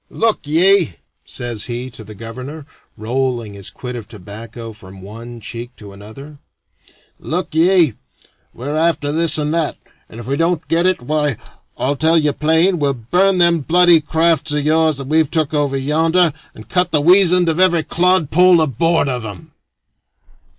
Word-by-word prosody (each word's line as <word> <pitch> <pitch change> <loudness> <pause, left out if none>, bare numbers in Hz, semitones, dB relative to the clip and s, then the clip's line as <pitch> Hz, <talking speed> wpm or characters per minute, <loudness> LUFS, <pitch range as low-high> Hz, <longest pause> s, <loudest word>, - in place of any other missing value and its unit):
"Look 225 -9 -1
ye," 170 - +3 0.3
says 120 -3 -4
he 125 +1 -5
to 115 - -10
the 105 0 -12
governor, 130 +8 -9 0.3
rolling 120 -1 -2
his 100 -1 -8
quid 125 -1 -8
of 115 -4 -8
tobacco 115 +4 -10
from 95 -2 -14
one 115 +4 -10
cheek 120 +3 -8
to 100 -2 -12
another 135 +9 -12 0.8
"look 175 +1 -4
ye, 165 - +3 0.6
we're 140 +5 -6
after 160 -2 0
this 160 0 +1
and 150 0 -1
that, 165 -2 -1 0.3
and 115 - -11
if 120 - -8
we 135 +3 -2
don't 165 0 -1
get 170 +2 +1
it, 185 -9 -1
why, 150 -2 -1 0.4
I'll 140 +2 -1
tell 160 +3 +2
you 150 -2 +1
plain, 160 +5 +2
we'll 140 -2 0
burn 180 - +1
them 170 -1 +4
bloody 170 +2 +4
crafts 160 0 0
of 150 -1 -1
yours 155 -1 +2
that 135 - -6
we've 155 +1 +1
took 155 -2 -1
over 145 -2 0
yonder, 160 +4 +2 0.2
and 110 - -13
cut 180 -1 +1
the 155 - +2
weasand 180 +2 +4
of 165 +1 0
every 175 -3 +3
clodpoll 180 0 +3
aboard 160 +2 +1
of 125 -3 -3
'em." 100 -5 -9
150 Hz, 165 wpm, -17 LUFS, 120-165 Hz, 0.8 s, them